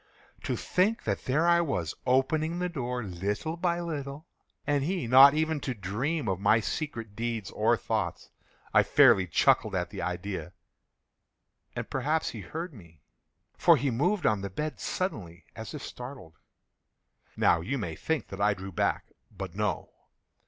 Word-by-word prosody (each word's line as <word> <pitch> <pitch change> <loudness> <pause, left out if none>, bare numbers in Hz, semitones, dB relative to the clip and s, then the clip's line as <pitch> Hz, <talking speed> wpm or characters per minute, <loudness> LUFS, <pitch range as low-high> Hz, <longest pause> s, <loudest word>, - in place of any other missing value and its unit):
To - - -1
think 205 +5 +1
that - - -2
there 150 +6 +2
I 170 0 +5
was, 90 - -2
opening 155 +6 +2
the 180 0 -1
door, 125 -6 -3
little 100 - -3
by 170 0 0
little, 145 -2 -5 0.4
and 145 -1 +1
he 175 -1 -1
not 135 +4 +8
even 160 0 0
to 130 -2 -4
dream 115 - -2
of 95 -2 -1
my 105 +3 +4
secret 115 -4 -4
deeds 115 -4 -3
or - - +2
thoughts. - - -3 0.4
I - - +7
fairly 95 -1 +5
chuckled 100 +4 +3
at 90 -1 -2
the - - -5
idea; 90 0 -4 1.2
and - - -4
perhaps 155 +2 0
he 110 - -7
heard 165 - -6
me; 85 - -16 0.5
for - - +5
he 140 -2 0
moved 175 - +1
on 105 -2 +2
the 100 - -4
bed 150 +11 -4
suddenly, 90 - -4
as 110 +6 -7
if 145 - -7
startled. 125 - -9 1.0
Now 85 - +4
you 125 +11 -2
may 85 -9 -4
think 160 - -2
that 95 +1 -6
I 105 0 +3
drew 95 +1 -8
back—but 95 +1 -3
no. 105 +1 -2
125 Hz, 160 wpm, -28 LUFS, 95-155 Hz, 1.2 s, not